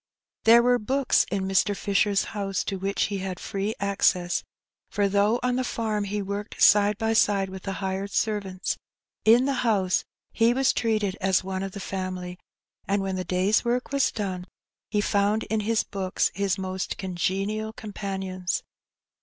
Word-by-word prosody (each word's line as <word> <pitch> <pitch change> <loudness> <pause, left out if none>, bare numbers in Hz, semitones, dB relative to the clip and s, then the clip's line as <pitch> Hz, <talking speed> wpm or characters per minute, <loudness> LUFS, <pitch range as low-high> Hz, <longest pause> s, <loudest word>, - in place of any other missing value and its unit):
There 235 +1 +7
were 245 0 +3
books 265 +4 +2
in 195 -1 -1
Mr. 195 +1 +2
Fisher's 200 0 +2
house 195 -2 -2
to 195 - -3
which 195 +1 0
he 200 -1 -2
had 185 -1 -4
free 205 +2 -3
access, 185 -3 +1 0.5
for 205 -2 +1
though 205 +4 +2
on 250 0 +1
the 255 - 0
farm 215 -4 -2
he 205 +1 -2
worked 200 +2 -5
side 205 0 +5
by 225 +1 0
side 200 -3 +2
with 190 0 -7
the 195 - -4
hired 195 +1 -3
servants, 200 -3 -1 0.5
in 235 +4 +6
the 280 - +1
house 200 -6 +2 0.3
he 230 +1 +3
was 270 0 +3
treated 215 -4 0
as 190 -1 +2
one 190 0 -3
of 195 -1 -5
the 200 - -6
family; 185 -2 -5 0.5
and 195 0 +1
when 190 -1 -2
the 185 - -2
day's 185 +4 +2
work 245 +2 -1
was 280 -1 +2
done, 185 -4 -4 0.4
he 210 -1 +1
found 205 +2 +1
in 220 - +2
his 220 +1 +1
books 190 -2 -1
his 195 -1 0
most 190 0 -3
congenial 195 +4 -2
companions. 195 -4 -4
200 Hz, 170 wpm, -26 LUFS, 190-220 Hz, 0.5 s, There